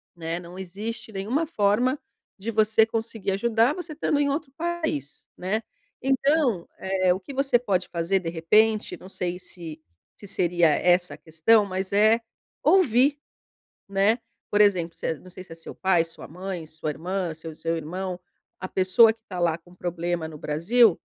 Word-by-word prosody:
né, 165 0 -4
não 175 +1 -11
existe 205 +5 -6
nenhuma 220 +11 -1
forma 245 +1 +2 0.4
de 220 +4 -3
você 220 0 +4
conseguir 225 -3 -3
ajudar, 225 +5 +2
você 355 -3 -6
estando 295 -1 0
em 285 -1 +2
outro 280 0 -2
país, 320 - -3
né. 205 +5 -2 0.4
Então, 270 - +2
eh, 190 -1 +2
o 185 - -4
que 200 +9 -10
você 270 -2 +3
pode 200 -7 0
fazer 170 +3 0
de 170 -3 -4
repente, 210 +7 +2
não 185 - -12
sei 180 -2 -3
se 165 -4 -8 0.4
se 205 - -12
seria 175 -3 +3
essa 175 +4 +2
a - - -17
questão, 170 +7 +3
mas 190 0 -3
é 215 +3 +5 0.4
ouvir, 290 - +4 0.7
né. 200 +4 +3 0.3
Por 205 - +2
exemplo, 180 -5 +2
se - - -4
é - - +1
não 185 - -15
sei 185 0 -10
se 175 - -11
é - - -12
seu 165 - -10
pai, 185 -3 +3
sua 165 0 -12
mãe, 180 0 -6
sua 155 0 -5
irmã, 180 +2 -3
seu 160 0 -9
seu 165 +1 -2
irmão, 180 +3 -4 0.4
a 185 - -4
pessoa 190 +4 +5
que 225 - -32
está 185 -5 -7
lá 170 -2 +2
com 175 +1 -20
problema 175 -2 -2
no 155 -1 -9
Brasil, 180 +9 +3
190 Hz, 175 wpm, -25 LUFS, 175-225 Hz, 0.7 s, é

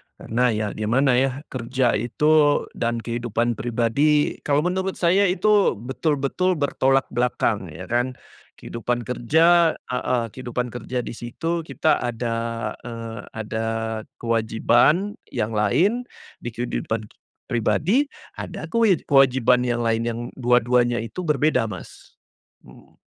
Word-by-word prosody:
Karena 125 +3 0
ya 110 -2 0
gimana 125 +6 +1
ya, 135 +2 -1
kerja 125 0 0
itu 145 +6 +3
dan 115 -1 -2
kehidupan 120 0 -1
pribadi, 125 +6 +1
kalau 145 +1 +2
menurut 190 +2 -1
saya 185 +3 +3
itu 205 - +3
betul-betul 140 - -1
bertolak 135 -3 +2
belakang 120 -5 0
ya 80 +3 -9
kan, 120 +6 -1 0.4
kehidupan 120 +1 -3
kerja 160 +8 +3
heeh, 125 -1 -2
kehidupan 125 0 -4
kerja 120 +1 -4
di - - -6
situ 165 +8 -4
kita 155 - +1
ada, 120 -1 -2 0.5
eee, 115 -1 -6 0.2
ada 110 0 -3 0.5
kewajiban 120 - +2 0.2
yang 110 -2 -1
lain 180 - +1 0.3
di - - -8
kehidupan 110 -2 -3 0.4
pribadi 180 - +2 0.3
ada - - -6
kewe 225 -7 +3
kewajiban 130 -3 +4
yang 120 -1 0
lain 115 0 +1
yang 115 0 -3 0.2
dua-duanya 120 -1 +2
itu 175 +9 -6
berbeda, 150 -5 +2
Mas. 100 -4 -10 0.5
Mhm. - - -18
125 Hz, 120 wpm, -23 LUFS, 115-150 Hz, 0.5 s, kewajiban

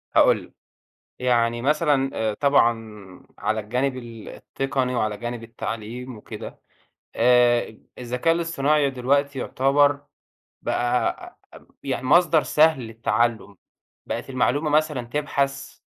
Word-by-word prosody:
هاقول - - +5
لك، - - -18 0.7
يعني 120 -2 +1
مثلًا 145 -2 +2
آآ، 110 -1 -1
طبعًا 115 -8 0 0.2
على 110 0 -1
الجانب 125 +5 -1
ال 115 -3 -9
التقني 135 -2 -3
وعلى 110 -3 -1
جانب 120 +1 -5
التعليم 115 +2 -6
وكده، 105 - -9 0.6
آآ، 120 -2 +3 0.2
الذكاء 125 +7 0
الاصطناعي 150 -4 +1
دلوقتي 135 +2 0
يعتبر 140 +3 +2 0.6
بقى 120 +1 -1 0.5
يعني 130 -1 -3
مصدر 165 +1 +4
سهل 155 -3 +3
للتعلّم، 115 -2 -1 0.5
بقِت - - -5
المعلومة 140 +4 0
مثلًا 150 -3 +1
تبحث، 140 -9 -2
125 Hz, 105 wpm, -23 LUFS, 115-140 Hz, 0.7 s, هاقول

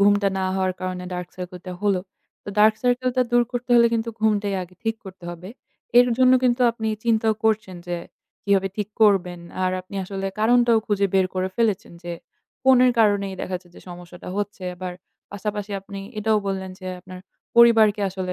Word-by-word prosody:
ঘুমটা 205 0 +4
না 190 - 0
হওয়ার 190 -1 0
কারণে 185 -1 -4
dark 180 0 -5
circle 180 -1 -7
টা 180 - -4
হলো। 200 -3 +2 0.4
তো - - -9
dark 215 +1 +6
circle 250 0 +1
টা 255 - +5
দূর 240 0 +5
করতে 245 0 -4
হলে 235 0 +7
কিন্তু 230 0 -1
ঘুমটাই 210 -2 +1
আগে 180 +1 -12
ঠিক 225 - 0
করতে 185 -2 -11
হবে। 175 +2 -9 0.5
এর 245 - +7
জন্য 255 0 +6
কিন্তু 245 0 +2
আপনি 225 -1 -4 0.2
চিন্তাও 220 -1 +2
করছেন 215 -4 +1
যে, 175 - -1 0.5
কিভাবে 195 -1 +2
ঠিক 210 -2 -2
করবেন। 180 -4 +3 0.2
আর 185 - +2
আপনি 185 +2 -14
আসলে 195 0 -4
কারণটাও 235 0 +4
খুঁজে 200 -1 +2
বের 190 -1 +4
করে 185 0 0
ফেলেছেন 225 -2 0
যে, 175 0 -5 0.5
ফোনের 255 -1 +6
কারণেই 200 -3 +2
দেখা 185 - -4
যাচ্ছে 175 0 -15
যে - - -13
সমস্যাটা 175 0 -10
হচ্ছে। 205 -2 -4
আবার 180 0 -5 0.4
পাশাপাশি 205 0 -4
আপনি 195 0 -9 0.2
এটাও 215 0 +2
বললেন 190 -1 -3
যে 185 - -8
আপনার 185 +1 -11 0.4
পরিবারকে 225 -3 +6
আসলে 185 -1 -4
200 Hz, 185 wpm, -23 LUFS, 185-225 Hz, 0.5 s, হলে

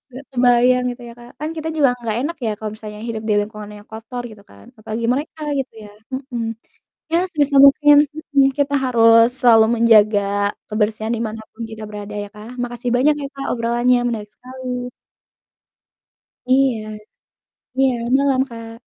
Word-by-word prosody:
gak 270 - -8
kebayang 250 0 +3
gitu 245 0 -11
ya - - -10
Kak, 240 0 -13
kan 305 +1 -3
kita 315 0 -4
juga 290 -4 +4 0.2
gak 220 0 0
enak 320 +4 -3
ya 220 - 0
kalau 215 -1 -4
misalnya 215 -1 -9
hidup 220 -1 -4
di - - +3
lingkungan 210 0 -8
yang 205 - -18
kotor 225 +3 -7
gitu 205 -2 -15
kan 100 0 -17
apalagi 220 +1 -4
mereka 300 +3 -5 0.2
gitu 265 - -5
ya, - - -12 0.2
mhm. 260 -3 -4 0.7
Ya 335 - +4
sebisa 290 -3 +1
mungkin 295 +1 +6 0.4
mhm, 275 -1 +6
kita 285 0 0
harus 230 -2 +6 0.2
selalu 225 -3 +6
menjaga 215 -3 +5 0.5
kebersihan 215 +1 -1
di 225 - -4
mana 220 +1 -7
pun 230 - -7
kita 220 0 -8
berada 210 0 -8
ya - - -8
Kak. 210 +2 -10
Makasih 240 0 -4
banyak 290 +4 +3
ya 280 - -4
Kak 275 0 -5
obrolannya 240 +1 +1
menarik 215 -3 -4
sekali. 250 -1 -6 1.6
Iya. 260 -3 +3 1.0
Iya, 265 -1 +3 0.2
malam 275 -2 +2
Kak. 230 -1 -9
240 Hz, 165 wpm, -20 LUFS, 220-265 Hz, 1.6 s, mungkin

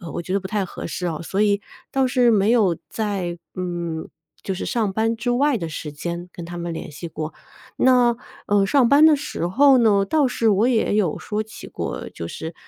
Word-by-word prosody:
呃， 170 -3 -8
我 170 - -4
觉 180 - -5
得 200 - +1
不 190 - -7
太 205 -1 -1
合 180 - -7
适 180 +2 -4
啊， 160 -3 -3
所 190 +4 -1
以 205 -1 +2 0.3
倒 270 -1 +2
是 250 -2 +3
没 210 -1 +3
有 205 -8 +3
在 195 -5 -3 0.2
嗯， 175 -3 -4 0.3
就 195 - -3
是 185 - -4
上 220 -4 0
班 225 +2 +1
之 225 +2 -2
外 265 +1 +2
的 165 -4 -4
时 155 -1 -6
间 170 +4 -5
跟 170 - -8
他 175 +1 -7
们 170 0 -4
联 165 - -6
系 150 +4 -8
过。 155 0 -6 0.4
那， 245 -2 +4 0.3
呃， 205 -1 +3
上 250 +4 +3
班 285 +4 +6
的 315 -1 +7
时 280 - -3
候 270 +9 +5
呢， 205 -5 +4
倒 305 +1 +2
是 235 -2 +1
我 210 +2 +3
也 235 -5 +2
有 200 -7 +1
说 210 0 -3
起 215 0 -11
过， - - -5
就 85 - -7
是， 160 - -7
200 Hz, 235 characters per minute, -22 LUFS, 175-240 Hz, 0.4 s, 的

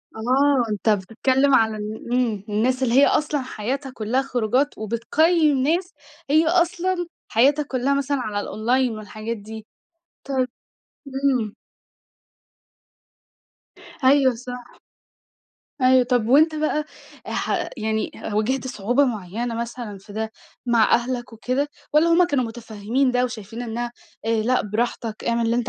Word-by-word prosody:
آه، 255 +2 +2
أنتَ 210 +2 0
بتتكلم 265 +7 +2
عن 220 -2 +3
ال 215 +3 -5
إمم، 230 -6 0
الناس 250 +5 +1
اللي 235 -2 +1
هي 280 - +7
أصلًا 295 -2 +1
حياتها 260 +3 -4
كلها 245 +3 0
خروجات 255 +2 0
وبتقيم 290 - +2
ناس 335 +8 0 0.4
هي 315 +2 +4
أصلًا 350 +1 +1 0.2
حياتها 280 +7 +3
كلها 270 0 0
مثلًا 280 0 0
على 210 -3 -2
الأونلاين 245 +5 0
والحاجات 215 +2 -6
دي 215 +1 -9 0.6
طيب 260 -2 0 0.6
إمم 265 -5 0 2.2
أيوه - - -16
صح. - - -22
أيوه 270 -3 +4
صح، 250 +1 -7 1.2
أيوه. 255 0 +6
طب 245 -3 +1
وأنتَ 310 +5 +5
بقى 305 0 0 0.4
ح - - -1
يعني 220 -1 -1
ه 210 - -5
واجهت 255 +5 0
صعوبة 245 +4 +1
معينة 230 +1 -3
مثلًا 235 -3 -5
في 200 +2 -14
ده 220 +1 -3 0.3
مع 235 -2 +3
أهلك 240 0 -2
وكده 255 +6 -1 0.2
والّا 305 +3 +5
هم 335 +2 +5
كانوا 280 -6 +1
متفهمين 230 +2 -1
ده 250 0 +2
وشايفين 230 -1 -6
إنها 240 +1 -4 0.3
آآ، - - +1
لأ 250 +3 +2
براحتك 220 +1 -3
أعمل 235 0 +1
اللي 230 +1 +1
أنتَ 240 -1 -1
245 Hz, 140 wpm, -23 LUFS, 220-275 Hz, 2.2 s, هي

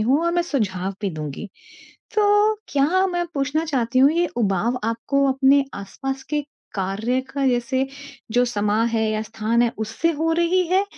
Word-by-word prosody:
हूँ 260 +8 +3
और 340 - +1
मैं 345 0 +2
सुझाव 195 - -2
भी 200 -2 -1
दूँगी। 155 +5 -6 0.7
तो 415 0 +4
क्या 335 +7 +2
मैं 350 -1 -1
पूछना 290 +3 0
चाहती 255 -5 0
हूँ, 275 +2 +6
ये 345 +1 +2
उबाऊ 220 +2 +1
आपको 255 +5 0
अपने 270 +1 +4
आसपास 265 +7 -5
के 295 -1 0 0.3
कार्य 210 +7 -1
का 275 -1 +1
जैसे 260 +1 +1 0.5
जो 245 +1 +4
समाँ 210 -1 +1
है 225 -1 0
या 215 0 -1
स्थान 225 +2 0
है, 235 - +1
उससे 220 +10 0
हो 320 +2 0
रही 345 +2 +2
है 380 +3 +3
260 Hz, 170 wpm, -22 LUFS, 220-315 Hz, 0.7 s, हूँ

